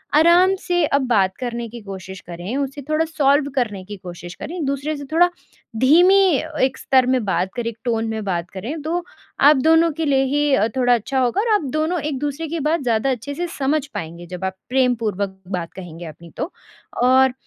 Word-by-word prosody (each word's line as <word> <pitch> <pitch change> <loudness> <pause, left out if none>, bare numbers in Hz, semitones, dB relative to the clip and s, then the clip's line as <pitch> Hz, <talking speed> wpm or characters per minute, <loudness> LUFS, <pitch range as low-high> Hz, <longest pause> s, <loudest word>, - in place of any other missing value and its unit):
आराम 345 +4 +6
से 350 -2 +1
अब 280 -2 +1
बात 195 -5 +2
करने 240 -2 -4
की 235 +1 -9
कोशिश 190 -2 -8
करें 175 +7 -5
उसे 280 0 -3
थोड़ा 310 +1 +2
सॉल्व 285 -2 +2
करने 215 -7 -1
की 205 +1 -8
कोशिश 175 -1 -9
करें 335 - -7
एक-दूसरे 280 -1 -2
से 285 - -7
थोड़ा 350 +2 +5 0.5
धीमी 350 - +6 0.4
एक 265 0 +1
स्तर 260 -1 +3
में 255 -2 +2
बात 185 -1 0
करें। 240 -1 -2
एक 230 - -10
टोन 225 -2 0
में 220 -1 -3
बात 175 -3 -2
करें। 245 - -5
तो 335 +4 -2 0.4
आप 290 +2 +7
दोनों 325 +4 +4
के 320 +2 -3
लिए 270 -2 +3
ही 290 +1 +1
अ, 220 - +2
थोड़ा 245 -1 +4
अच्छा 245 +4 0
होगा 255 +10 +1
और 450 0 +1
आप 415 - +1
दोनों 315 +4 0
एक-दूसरे 290 +2 -3
की 330 +2 -3
बात 310 +2 0
ज़्यादा 235 +2 +1
अच्छे 260 +3 -4
से 350 +3 -2
समझ 280 +1 +1
पाएँगे 170 - -7
जब 180 +1 -7
आप 190 0 -3
प्रेमपूर्वक 220 -7 0
बात 175 -3 -3
कहेंगे 175 -2 -9
अपनी 165 +2 -11
तो, 350 - -3 0.5
और 260 +1 +5
260 Hz, 200 wpm, -21 LUFS, 205-305 Hz, 0.5 s, आप